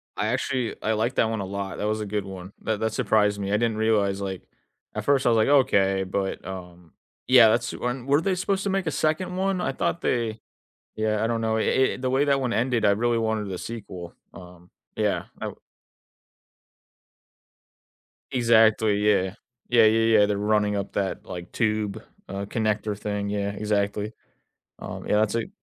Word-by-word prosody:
I 105 Hz, +2 st, -1 dB
actually, 125 Hz, 0 st, -1 dB
I 110 Hz, -, 0 dB
like 115 Hz, +4 st, -1 dB
that 110 Hz, -, +2 dB
one 110 Hz, -3 st, -2 dB
a -, -, -3 dB
lot, 100 Hz, 0 st, -5 dB
that 105 Hz, -, -1 dB
was 110 Hz, 0 st, -1 dB
a -, -, -3 dB
good 100 Hz, -1 st, -3 dB
one, 95 Hz, 0 st, -9 dB
that 110 Hz, -2 st, -1 dB
that 110 Hz, -1 st, -1 dB
surprised 105 Hz, -1 st, +2 dB
me. 100 Hz, 0 st, -3 dB
I 105 Hz, -, +2 dB
didn't 115 Hz, -1 st, 0 dB
realize, 100 Hz, -3 st, +1 dB
like, 95 Hz, -2 st, -4 dB, 0.5 s
at -, -, -3 dB
first 140 Hz, -2 st, +2 dB
I -, -, +5 dB
was 115 Hz, -, +4 dB
like, 110 Hz, -, +3 dB
okay, 100 Hz, -9 st, +3 dB
but 95 Hz, 0 st, -3 dB
um 90 Hz, -3 st, -9 dB, 0.3 s
yeah, 125 Hz, -3 st, +8 dB
that's 120 Hz, +2 st, +1 dB
when 125 Hz, 0 st, -3 dB
weren't 145 Hz, +4 st, +2 dB
they 195 Hz, -2 st, +1 dB
supposed 195 Hz, +2 st, -1 dB
to 200 Hz, -, -1 dB
make 190 Hz, -3 st, -1 dB
a -, -, +1 dB
second 180 Hz, +5 st, -1 dB
one? 190 Hz, 0 st, 0 dB
I 135 Hz, -, 0 dB
thought 170 Hz, -, -1 dB
they 115 Hz, -2 st, -1 dB, 0.6 s
yeah, 110 Hz, 0 st, 0 dB
I -, -, +2 dB
don't 115 Hz, 0 st, -1 dB
know, 110 Hz, 0 st, 0 dB
i 130 Hz, +4 st, +2 dB
i -, -, -6 dB
the 130 Hz, 0 st, -2 dB
way 135 Hz, +2 st, +3 dB
that 140 Hz, -1 st, +2 dB
one 125 Hz, -3 st, -1 dB
ended, 120 Hz, -1 st, +1 dB
I 100 Hz, -, +5 dB
really 115 Hz, +3 st, +1 dB
wanted 110 Hz, -2 st, -1 dB
the 95 Hz, -, -4 dB
sequel, 95 Hz, -7 st, -7 dB, 0.2 s
um, 90 Hz, 0 st, -13 dB, 0.3 s
yeah, -, -, 0 dB, 0.2 s
I -, -, -3 dB
r -, -, -8 dB, 2.8 s
Exactly, 110 Hz, -3 st, +4 dB
yeah, 95 Hz, -2 st, +2 dB, 0.3 s
yeah, 120 Hz, -2 st, +6 dB
yeah, 115 Hz, 0 st, +4 dB
yeah, 105 Hz, -, +6 dB
they're 105 Hz, -1 st, -1 dB
running 105 Hz, 0 st, +1 dB
up 100 Hz, -1 st, -4 dB
that, 95 Hz, -1 st, -2 dB
like, 90 Hz, 0 st, -8 dB
tube, 110 Hz, -2 st, -1 dB, 0.3 s
uh, 100 Hz, +1 st, -4 dB
connector 110 Hz, -1 st, -1 dB
thing, 105 Hz, -1 st, -3 dB
yeah, 100 Hz, 0 st, -1 dB
exactly, 105 Hz, +1 st, -1 dB, 0.6 s
um, -, -, -7 dB
yeah, -, -, +2 dB
that's 105 Hz, -1 st, +2 dB
it 115 Hz, +10 st, -2 dB
110 Hz, 195 wpm, -25 LUFS, 100-120 Hz, 2.8 s, yeah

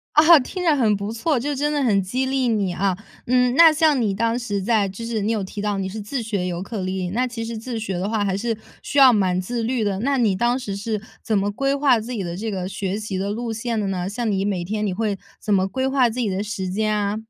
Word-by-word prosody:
啊！ 320 Hz, +2 st, +8 dB
听 360 Hz, +8 st, -5 dB
着 320 Hz, -4 st, +4 dB
很 225 Hz, -6 st, +3 dB
不 200 Hz, +2 st, -4 dB
错， 250 Hz, +4 st, 0 dB
就 285 Hz, +3 st, -2 dB
真 295 Hz, +2 st, 0 dB
的 290 Hz, -1 st, 0 dB
很 205 Hz, -6 st, +3 dB
激 250 Hz, +8 st, -1 dB
励 260 Hz, -1 st, 0 dB
你 200 Hz, -5 st, 0 dB
啊。 190 Hz, -1 st, 0 dB, 0.3 s
嗯， 250 Hz, 0 st, +3 dB
那 330 Hz, 0 st, +8 dB
像 310 Hz, -3 st, +3 dB
你 205 Hz, -3 st, +1 dB
当 230 Hz, +3 st, 0 dB
时 205 Hz, -5 st, -2 dB
在 210 Hz, -1 st, +2 dB
就 230 Hz, +5 st, -7 dB
是 225 Hz, -2 st, -2 dB
你 215 Hz, +3 st, 0 dB
有 215 Hz, -3 st, 0 dB
提 200 Hz, +2 st, -6 dB
到 205 Hz, -1 st, -1 dB
你 190 Hz, -1 st, -2 dB
是 215 Hz, +2 st, -6 dB
自 240 Hz, +5 st, -3 dB
学 200 Hz, -5 st, -2 dB
尤 175 Hz, 0 st, -3 dB
克 205 Hz, 0 st, -5 dB
里 185 Hz, +1 st, -2 dB
里， 175 Hz, -, -2 dB
那 250 Hz, +4 st, +1 dB
其 230 Hz, -2 st, -5 dB
实 230 Hz, -1 st, -5 dB
自 230 Hz, 0 st, -5 dB
学 195 Hz, -5 st, -3 dB
的 195 Hz, +3 st, -2 dB
话 220 Hz, -2 st, 0 dB
还 190 Hz, -1 st, 0 dB
是 225 Hz, 0 st, -2 dB, 0.3 s
需 285 Hz, -, -4 dB
要 265 Hz, -3 st, +8 dB
蛮 185 Hz, -3 st, +2 dB
自 230 Hz, +5 st, -3 dB
律 240 Hz, -1 st, 0 dB
的。 195 Hz, -1 st, -1 dB
那 275 Hz, +3 st, +1 dB
你 215 Hz, -6 st, +2 dB
当 240 Hz, +5 st, +1 dB
时 200 Hz, -6 st, -5 dB
是 210 Hz, 0 st, -3 dB, 0.2 s
怎 215 Hz, -2 st, +1 dB
么 200 Hz, +1 st, +1 dB
规 275 Hz, +6 st, 0 dB
划 280 Hz, -4 st, +4 dB
自 230 Hz, +3 st, -7 dB
己 210 Hz, -6 st, -3 dB
的 170 Hz, 0 st, -4 dB
这 220 Hz, +3 st, -3 dB
个 185 Hz, -2 st, -3 dB
学 195 Hz, +1 st, -3 dB
习 210 Hz, -3 st, -4 dB
的 200 Hz, +2 st, -2 dB
路 230 Hz, +1 st, -3 dB
线 225 Hz, 0 st, -2 dB
的 200 Hz, -, -1 dB
呢？ 185 Hz, -1 st, -2 dB
像 230 Hz, +1 st, -2 dB
你 195 Hz, -1 st, 0 dB
每 190 Hz, -4 st, -1 dB
天 210 Hz, +2 st, -2 dB
你 190 Hz, -, -1 dB
会 210 Hz, -1 st, -1 dB, 0.2 s
怎 210 Hz, -, -1 dB
么 190 Hz, -1 st, +3 dB
规 260 Hz, +5 st, -1 dB
划 265 Hz, -3 st, +3 dB
自 245 Hz, +3 st, -5 dB
己 220 Hz, -4 st, 0 dB
的 190 Hz, +2 st, -2 dB
时 200 Hz, -3 st, -4 dB
间 215 Hz, +2 st, 0 dB
啊？ 205 Hz, 0 st, -1 dB
215 Hz, 300 characters per minute, -22 LUFS, 195-245 Hz, 0.3 s, 啊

